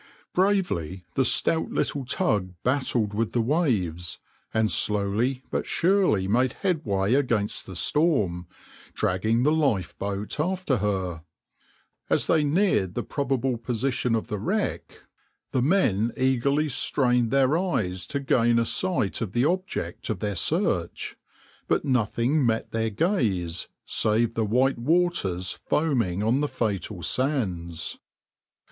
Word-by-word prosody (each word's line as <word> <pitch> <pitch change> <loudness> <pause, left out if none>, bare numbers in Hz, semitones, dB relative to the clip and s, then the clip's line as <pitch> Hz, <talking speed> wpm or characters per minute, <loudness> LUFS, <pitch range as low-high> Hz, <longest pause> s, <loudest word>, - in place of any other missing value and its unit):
\par 185 - +4
Bravely 95 - -1
the 135 - +2
stout 160 +5 +2
little 140 - -1
tug 105 - 0
battled 125 -5 0
with 110 +1 -1
the 120 - +1
waves, 110 - 0 0.3
and 110 -1 +1
slowly 105 +6 +1
but - - -2
surely 180 - +2
made 125 +5 +2
headway 110 - +1
against 120 -7 0
the 95 - -8
storm, 100 - +1 0.5
dragging 110 +6 +1
the 150 - +3
lifeboat 100 - -1
after 180 -4 0
her. 95 -5 -2 0.9
As - - +2
they 155 - +3
neared 145 - +1
the - - -2
probable 135 -3 -1
position 120 +1 -1
of 110 - -2
the 105 - -4
wreck, 200 - -3 0.5
the 130 - +1
men 120 - +2
eagerly 130 +4 +1
strained 125 -4 +1
their 135 +2 +3
eyes 105 - -1
to 140 - -2
gain 120 -3 +2
a 115 - +2
sight 130 - 0
of 105 -4 -3
the 120 +2 +2
object 180 - -2
of 110 - -1
their 105 +2 -2
search, 85 - 0 0.5
but - - +1
nothing 125 +3 +1
met 115 -2 0
their 110 0 0
gaze 100 - 0 0.2
save 110 +2 +1
the 115 -1 0
white 125 +5 +2
waters 120 - 0
foaming 120 - +1
on 120 +6 +2
the 150 - +1
fatal 105 -6 -3
sands. 90 - -1
120 Hz, 130 wpm, -25 LUFS, 100-145 Hz, 0.9 s, par